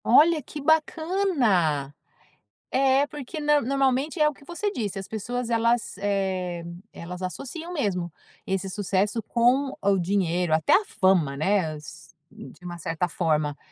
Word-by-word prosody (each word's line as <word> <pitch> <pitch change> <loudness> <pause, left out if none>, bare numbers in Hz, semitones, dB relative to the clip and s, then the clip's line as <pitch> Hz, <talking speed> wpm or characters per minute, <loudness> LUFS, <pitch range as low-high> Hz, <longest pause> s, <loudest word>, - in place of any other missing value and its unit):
Olha, 310 +6 +5
que 295 - -8
bacana! 290 - +1 0.8
É, 270 +1 +3
porque 295 0 -7
nã 295 0 +4
normalmente, 275 +4 0
é 300 - +6
o - - -7
que 280 - -19
você 375 +6 -2
disse, 210 - -3
as 195 - -7
pessoas 240 +3 -4
elas, 230 -2 +1
eh, 190 -4 -1 0.3
elas 180 +2 -8
associam 275 - -5
mesmo, 180 - -2 0.3
esse 195 0 -1
sucesso 205 +2 0
com 250 +5 +2
o 200 0 +3
dinheiro, 180 -2 0
até 160 -1 +2
a 420 - +4
fama, 180 - +2
né, 160 0 +1
s 155 +2 -12 0.2
de 135 +6 -13
uma 175 -1 -6
certa 165 +2 -2
forma. 155 -4 0
205 Hz, 145 wpm, -25 LUFS, 175-275 Hz, 0.8 s, é